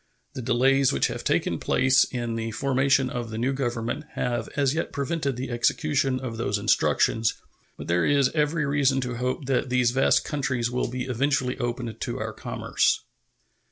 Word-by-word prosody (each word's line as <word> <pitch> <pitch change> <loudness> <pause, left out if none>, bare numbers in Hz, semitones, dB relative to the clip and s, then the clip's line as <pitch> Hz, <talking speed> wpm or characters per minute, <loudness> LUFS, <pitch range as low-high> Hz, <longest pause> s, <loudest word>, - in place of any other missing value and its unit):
The 130 - -5
delays 130 +3 +3
which - - +1
have - - -5
taken - - 0
place 130 0 +3
in 120 -2 -4
the 115 0 -3
formation 135 +3 +2
of 120 -2 -4
the 110 - -5
new 125 +4 0
government 120 +1 -3
have 120 -2 -2
as 140 -2 +2
yet 160 - -2
prevented 140 -1 -2
the 130 +1 -5
execution 135 +2 +1
of 120 -3 -5
those 105 -3 -1
instructions, 110 +2 +2 0.4
but - - -7
there 85 +1 +2
is 140 -2 +3
every 150 0 +1
reason 140 -2 +2
to 125 -2 -4
hope 125 +3 -2
that 130 0 0
these 125 -1 +2
vast 135 +2 +3
countries 130 -5 -1
will 125 - -1
be 125 +1 -4
eventually 130 +1 0
opened 120 -2 -4
to - - -3
our - - -4
commerce. - - 0
130 Hz, 175 wpm, -25 LUFS, 120-135 Hz, 0.4 s, delays